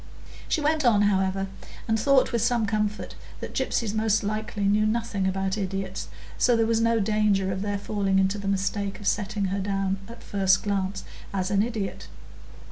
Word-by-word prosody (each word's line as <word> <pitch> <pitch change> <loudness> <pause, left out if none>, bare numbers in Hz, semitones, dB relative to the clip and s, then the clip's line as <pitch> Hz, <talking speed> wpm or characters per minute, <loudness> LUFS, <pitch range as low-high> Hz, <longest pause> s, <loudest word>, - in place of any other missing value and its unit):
She 315 - +1
went 305 +1 +1
on, 215 -5 +4
however, 195 -1 +1 0.4
and 225 0 +1
thought 275 +3 +4
with 235 - +1
some 235 -1 +2
comfort 210 0 -2 0.3
that - - -6
gypsies 220 -4 -1
most 220 -1 +2
likely 215 0 -3
knew 210 +2 +3
nothing 220 -3 -1
about 190 +2 -1
idiots, 195 -1 -3 0.3
so 245 - +4
there 225 -1 +3
was 225 0 +2
no 230 0 +3
danger 205 -2 +2
of 190 0 -3
their 205 0 -1
falling 200 -1 0
into 195 +2 +2
the 200 - -5
mistake 195 +1 -1
of 205 - -10
setting 205 0 0
her 200 - -1
down 195 0 -1
at 235 0 -11
the - - -16
first 195 -1 +2
glance 195 -1 -1 0.3
as 185 0 -1
an 200 -1 +3
idiot. 215 -4 -3
205 Hz, 185 wpm, -26 LUFS, 195-220 Hz, 0.4 s, on